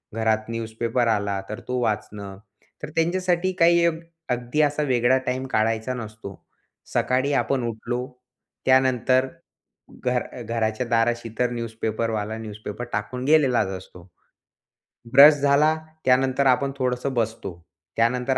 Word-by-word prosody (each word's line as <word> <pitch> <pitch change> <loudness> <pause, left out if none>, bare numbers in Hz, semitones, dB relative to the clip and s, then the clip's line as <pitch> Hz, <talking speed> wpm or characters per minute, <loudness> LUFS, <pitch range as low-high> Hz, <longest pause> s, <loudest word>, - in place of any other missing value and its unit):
घरात 110 0 0
न्यूजपेपर 115 +1 -1
आला 100 -3 0
तर 105 - -5
तो 125 0 -1
वाचणं. 105 -3 -3 0.5
तर 150 - -4
त्यांच्यासाठी 180 +2 +1
काही 170 0 +5 0.4
अगदी 125 +4 0
असा 150 0 +1
वेगळा 130 -1 +3
टाईम 130 +1 -1
काढायचा 110 +3 0
नसतो. 110 -4 -8 0.6
सकाळी 130 +3 +1
आपण 135 -1 0
उठलो. 120 +2 -3 0.6
त्यानंतर 130 0 +3 0.8
घर 125 -1 +1 0.2
घराच्या 115 +1 -1
दाराशी 115 0 +1
तर 125 -1 +2
न्यूजपेपरवाला, 110 -2 -3
न्यूजपेपर 110 +1 -7
टाकून 115 +5 -3
गेलेलाच 140 -8 +3
असतो. 90 -1 -14 1.1
ब्रश 145 +3 +10
झाला 145 +2 +4 0.3
त्यानंतर 130 +1 +3
आपण 135 +2 +2
थोडंसं 125 +1 -1
बसतो 110 -5 -2 0.5
त्यानंतर 125 +3 +1
125 Hz, 115 wpm, -24 LUFS, 110-130 Hz, 1.1 s, ब्रश